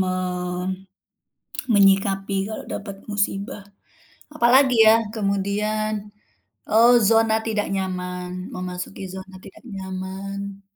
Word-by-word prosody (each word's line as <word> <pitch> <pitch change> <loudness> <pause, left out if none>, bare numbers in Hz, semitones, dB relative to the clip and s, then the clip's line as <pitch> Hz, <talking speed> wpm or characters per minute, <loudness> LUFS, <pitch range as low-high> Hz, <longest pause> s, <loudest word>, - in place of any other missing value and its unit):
Me 185 - +1 1.7
menyikapi 195 0 +3
kalau 220 - -6
dapat 200 -1 -6 0.2
musibah. 205 +2 -2 0.7
Apalagi 260 -1 +5
ya? 220 - +9 0.2
Kemudian, 210 +1 -1 0.8
oh 230 +3 +6 0.2
zona 225 0 +4
tidak 210 -2 0
nyaman, 180 -1 -3 0.2
memasuki 180 +1 -6
zona 190 0 -9
tidak - - -14
nyaman. 195 +1 -6
200 Hz, 90 wpm, -23 LUFS, 190-215 Hz, 1.7 s, ya